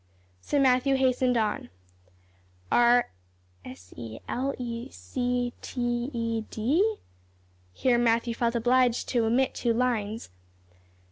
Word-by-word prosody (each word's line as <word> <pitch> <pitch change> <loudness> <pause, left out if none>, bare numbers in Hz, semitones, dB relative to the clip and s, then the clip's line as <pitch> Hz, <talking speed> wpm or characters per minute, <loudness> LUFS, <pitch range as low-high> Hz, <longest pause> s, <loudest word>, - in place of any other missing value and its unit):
So 285 - 0
Matthew 265 0 +3
hastened 255 -1 +2
on, 215 -2 -1 1.0
"'are 240 0 +4 0.5
s 90 -8 -12
e 115 -1 -8
l 270 +3 -1
e 235 -1 -5
c 245 - -2
t 240 0 -2
e 230 -2 -2
d 255 - +1 0.5
'" 90 0 -35
Here 240 - +2
Matthew 235 0 +2
felt 235 0 -1
obliged 245 +1 +2
to 235 -3 +1
omit 250 +4 +2
two 235 -2 0
lines. 225 - -1
240 Hz, 120 wpm, -27 LUFS, 225-250 Hz, 1.0 s, are